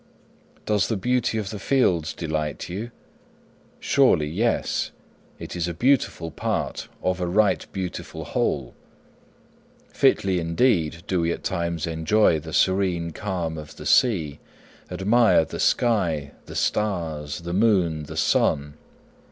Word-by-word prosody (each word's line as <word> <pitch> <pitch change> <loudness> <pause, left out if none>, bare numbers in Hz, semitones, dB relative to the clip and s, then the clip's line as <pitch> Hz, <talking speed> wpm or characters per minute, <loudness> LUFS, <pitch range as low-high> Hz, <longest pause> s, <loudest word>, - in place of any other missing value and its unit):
'Does 105 -2 +1
the 110 - -1
beauty 125 +2 0
of 105 -2 -3
the 105 - -6
fields 90 - +1
delight 80 -2 -3
you? 105 +7 -5 0.9
Surely, 130 - +3
yes; 110 +10 0 0.5
it - - -8
is 85 -1 -1
a 85 - -4
beautiful 120 -8 +1
part - - -3 0.2
of 90 0 0
a 90 - 0
right 100 +1 +2
beautiful 95 -3 -5
whole. 65 -4 -1 1.2
Fitly 95 -2 +2
indeed 85 -2 +1
do 95 -4 0
we 85 0 +1
at - - -5
times 85 -3 -2
enjoy 80 +2 +2
the 80 +1 -9
serene 90 -2 +1
calm 85 -4 -3
of 75 -1 -10
the - - -10
sea, 85 - +2 0.5
admire 110 -3 +3
the - - -7
sky, 85 - +1 0.2
the - - -9
stars, 80 -7 -1
the 85 +1 -5
moon, 90 -7 +2
the - - -8
sun. 75 +1 +1
90 Hz, 130 wpm, -24 LUFS, 80-105 Hz, 1.2 s, Surely